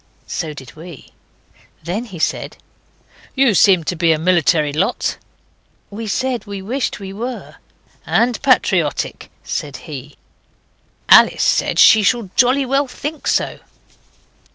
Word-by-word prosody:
So 155 -4 -5
did 130 -3 -12
we. 160 -3 -12 0.7
Then 190 +9 -3
he 190 -7 -10
said 160 - -2 0.8
'You 265 -4 +3
seem 185 -2 +4
to 175 - -3
be 165 0 +2
a 160 - +2
military 160 -3 +1
lot.' 190 +10 -1 0.7
We 220 +2 -6
said 250 +3 -2
we 200 -1 -6
wished 235 +7 -3
we 195 -1 -8
were. 240 +4 -7 0.5
'And 235 0 0
patriotic,' 185 - 0
said 145 -2 -5
he. 145 -2 -9 0.9
Alice - - +6
said - - +1
she 220 -3 +7
should 210 -2 0
jolly 260 +2 +3
well 275 +2 0
think 295 +4 -6
so. - - 0
195 Hz, 130 wpm, -18 LUFS, 165-245 Hz, 0.9 s, she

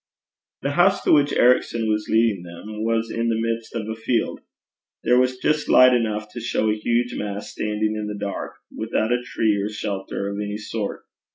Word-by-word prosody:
The 140 - 0
house 190 +6 +3
to - - +2
which 145 -1 +5
Ericson 120 -2 +3
was 105 0 0
leading 110 -4 +3
them 105 +5 -7
was 115 0 0
in 115 0 -1
the 115 -1 0
midst 115 0 -3
of 110 -2 -3
a 110 - -2
field. 115 +2 -1 0.6
There 125 +1 +4
was 130 0 +1
just 150 +3 0
light 130 0 +7
enough 110 -3 0
to 120 - -7
show 110 -2 0
a - - 0
huge 120 +3 0
mass 100 0 -5
standing 105 0 -1
in 105 -1 -3
the 105 0 -5
dark, 100 -1 -4 0.2
without 110 +1 0
a 125 - 0
tree 110 -4 0
or 105 - -2
shelter 100 -2 -4
of 100 - -5
any 105 0 -3
sort. 110 0 -4
110 Hz, 195 wpm, -23 LUFS, 105-120 Hz, 0.6 s, light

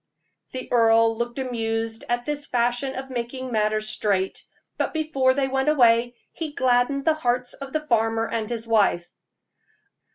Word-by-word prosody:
The 255 -1 -5
earl 225 -1 +4
looked 235 +2 -4
amused 225 -3 -3
at 240 0 -1
this 295 -1 -3
fashion 245 +2 0
of 265 0 -6
making 255 +1 -4
matters 215 -1 0
straight; 195 -3 -1 0.3
but - - -2
before 275 -5 +1
they 275 -1 +1
went 265 +2 0
away, 240 -4 +4 0.2
he 315 -3 -6
gladdened 255 +1 +1
the 320 - +4
hearts 250 -4 0
of 275 -1 -9
the 305 +1 -2
farmer 225 -3 +1
and 225 -1 -3
his 230 -1 -4
wife. 205 -6 +2
240 Hz, 155 wpm, -24 LUFS, 225-265 Hz, 0.3 s, earl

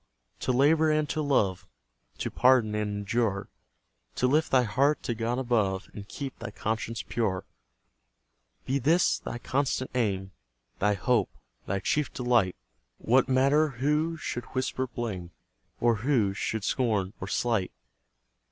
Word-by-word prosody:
To 130 - 0
labour 155 +5 +4
and 155 -1 +2
to 155 - -1
love, 105 -11 +1 0.5
To - - -3
pardon 125 -4 +4
and 105 0 -1
endure, 100 0 -1 0.7
To - - +1
lift 150 +5 +2
thy 130 -1 +4
heart 135 +7 +1
to 120 - -1
God 115 +2 -2
above, 110 -7 0
And 100 -1 -8
keep 135 +2 -6
thy 120 - -5
conscience 110 +1 -3
pure; 105 -6 -1 1.2
Be 135 +2 0
this 160 +7 +3
thy - - -5
constant 130 +1 -1
aim, 100 -6 -1 0.5
Thy 105 +1 +2
hope, 120 +5 +1 0.4
thy 95 +1 -1
chief 150 -2 0
delight; 120 -7 +2 0.4
What 130 +3 +2
matter 140 +4 +4
who 150 +4 +1
should 120 -6 -4
whisper 130 0 -1
blame 105 -8 -5 0.5
Or 115 -2 +3
who 110 -4 +1
should 105 +2 -3
scorn 105 -7 0
or - - -4
slight? 115 -6 0
120 Hz, 140 wpm, -28 LUFS, 105-135 Hz, 1.2 s, labour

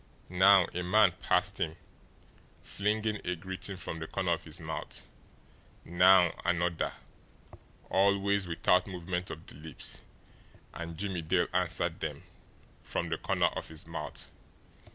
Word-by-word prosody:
Now 95 +1 +6
a 90 - -2
man 100 +2 +5
passed - - +1
him, 80 0 -1 0.9
flinging 105 +1 -1
a 90 - -1
greeting 95 +2 -5
from 80 -2 -6
the 80 - -5
corner 95 -1 -1
of 85 - -1
his 80 0 -9
mouth; 80 -2 -6 0.8
now 90 0 +6
another, 85 -1 0 0.9
always 100 0 +2
without 90 +2 +2
movement 90 -1 -4
of 80 - -8
the - - -13
lips 75 +2 -7 0.7
and 85 -1 -6
Jimmie 95 -2 -2
Dale 85 +2 +1
answered 90 -2 0
them - - -4 0.6
from - - -3
the - - -2
corner - - +2
of - - -4
his 80 -1 -9
mouth. - - -6
90 Hz, 135 wpm, -31 LUFS, 85-95 Hz, 0.9 s, Now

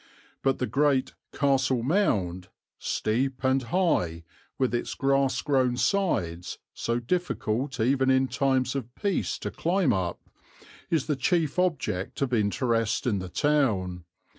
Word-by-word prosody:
But 135 -1 +1
the 125 - -1
great 135 +2 +1 0.2
'Castle 135 -3 +1
Mound,' 100 - +1 0.3
steep 130 +4 -1
and 130 +1 +3
high, 115 - 0 0.3
with 130 -2 0
its 120 - -2
grass 135 -1 +1
grown 130 -4 +2
sides, 90 - 0 0.2
so 115 +1 -1
difficult 130 -4 -2
even 130 +3 +2
in 130 0 +3
times 130 -1 +1
of 125 -3 -5
peace 200 -3 -1
to - - -5
climb 180 -3 +1
up, 90 -3 -2 0.7
is 160 -5 +1
the 150 - 0
chief 155 +3 +1
object 140 - -1
of 130 -2 -2
interest 115 +3 +1
in 105 -6 +1
the 95 -1 -6
town. 95 - +1
130 Hz, 135 wpm, -27 LUFS, 110-140 Hz, 0.7 s, and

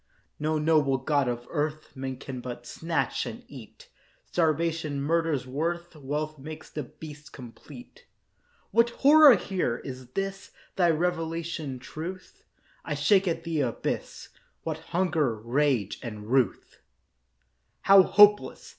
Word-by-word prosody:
No 155 +1 0
noble 150 -3 +2
god 140 0 0
of 120 0 -3
earth, 155 0 -3
Man 130 -1 -5
can 130 -1 -7
but 120 -1 -7
snatch 165 +6 -2
and - - -8
eat; - - -13 0.4
Starvation 160 -2 0
murders 155 -2 0
worth, 170 +6 -3
Wealth 150 +1 -4
makes 155 +3 -9
the 150 - -4
beast 150 +2 -11
complete. 245 - -13 0.6
What 230 +1 +4
horror 285 +2 +7
here! 180 -11 -2
Is 130 -2 -8
this 195 0 -4 0.3
Thy 175 -3 +3
revelation, 165 -3 -2
Truth? 185 - -8 0.4
I - - -3
shake 195 -2 +3
at 165 -1 -1
the 165 -3 -1
abyss. 120 -4 -3 0.3
What - - -3
hunger, 165 -9 +1
rage, 120 -2 0
and 105 -3 -7
ruth, 130 -7 0 1.0
How 195 0 +8
hopeless! 205 +2 +4
155 Hz, 125 wpm, -27 LUFS, 135-175 Hz, 1.0 s, How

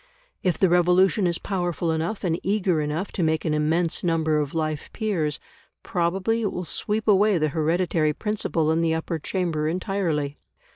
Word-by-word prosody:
If 180 -2 +1
the 190 - +4
revolution 180 +3 +3
is 170 -1 0
powerful 175 -4 -2
enough 165 +6 -2
and 170 -2 0
eager 190 -5 +1
enough 150 +6 -3
to - - -3
make 160 -1 +1
an 155 - +1
immense 160 +3 0
number 160 -3 +1
of 145 +1 -3
life 155 -2 -2
peers, 170 -9 -1 0.4
probably 190 +6 0
it 205 - 0
will 180 - -4
sweep 215 +5 -2
away 205 -1 +4
the 155 -1 +1
hereditary 160 0 +1
principle 170 -6 -1
in 160 +1 +1
the 165 -1 +1
Upper 160 0 -3
Chamber 160 -2 -1
entirely. 165 -5 -1
170 Hz, 165 wpm, -24 LUFS, 155-190 Hz, 0.4 s, the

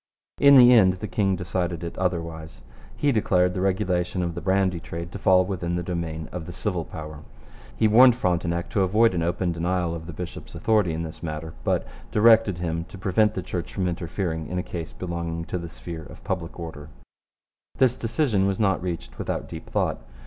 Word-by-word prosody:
In 140 0 +8
the 125 -1 +9
end 95 -6 +6
the 95 +4 -6
king 95 -3 +1
decided 90 -2 -3
it 85 - -5
otherwise. 80 -6 -3 0.3
He 145 - +2
declared 90 -6 +2
the 90 - -2
regulation 90 -1 0
of 85 -1 -2
the 85 - -6
brandy 95 -2 +1
trade 85 +1 -7
to 100 - -7
fall 95 -1 +4
within 85 -2 -2
the 90 - -2
domain 80 -3 -4
of 90 -3 -6
the - - -6
civil 90 -1 -2
power. 75 -1 -8 0.6
He 110 - +4
warned 120 +3 +7
Frontenac 85 -4 -1
to 100 - +1
avoid 105 +4 +4
an 85 - -1
open 85 +1 0
denial 85 0 -1
of 80 -1 -7
the 85 - -7
bishop's 90 +3 -8
authority 105 -6 +2
in 80 +1 -3
this 80 -1 -8
matter, 80 0 -5
but - - 0 0.3
directed 110 -3 +5
him 85 -1 -2
to 95 - -12
prevent 100 +3 +2
the 95 - -3
Church 85 0 -4
from 95 -2 0
interfering 85 -1 -3
in 90 - -4
a 90 - -1
case 85 -4 -6
belonging 85 -2 -4
to 90 - -3
the 85 0 -7
sphere 80 0 -8
of - - -13
public 90 -2 -4
order. 80 -3 -7 0.9
This 125 -2 +4
decision 115 -5 +1
was 100 -1 -1
not 100 -4 +2
reached 85 -2 -5
without - - -3
deep - - -9
thought. - - 0
90 Hz, 200 wpm, -25 LUFS, 85-95 Hz, 0.9 s, the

